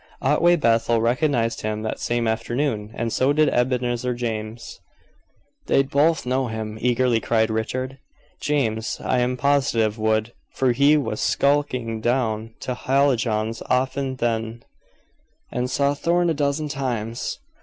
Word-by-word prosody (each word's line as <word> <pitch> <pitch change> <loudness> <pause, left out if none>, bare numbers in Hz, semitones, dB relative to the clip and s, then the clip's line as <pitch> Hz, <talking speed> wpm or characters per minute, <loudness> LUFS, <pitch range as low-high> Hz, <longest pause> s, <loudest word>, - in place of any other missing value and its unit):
Otway 160 +6 +4
Bethel 115 -5 +2
recognized 120 0 +1
him 110 0 -3
that 110 - -3
same 120 -1 -1
afternoon, 115 0 -1
and 115 -1 -2
so 135 +2 +2
did 155 0 +3
Ebenezer 125 0 0
James." 115 -1 -5 0.9
"They'd 135 0 +2
both 155 +2 +2
know 130 +1 0
him," 110 -1 -5
eagerly 125 -1 +2
cried 110 0 +1
Richard. 130 +4 -3 0.4
"James 115 -6 -1
I 125 - 0
am 125 +1 0
positive 120 -6 +1
would, 110 +1 0 0.2
for 130 -2 +2
he 140 +5 +4
was 120 -7 -2
skulking 130 -6 0
down 115 -2 -1
to 125 - -3
Hallijohn's 120 -5 +1
often 130 +1 0
then, 115 -1 -2 0.9
and 125 +1 -2
saw 140 +2 +1
Thorn 170 +3 +1
a - - +1
dozen 145 +1 -1
times. 120 -5 -3
125 Hz, 135 wpm, -23 LUFS, 115-140 Hz, 0.9 s, Otway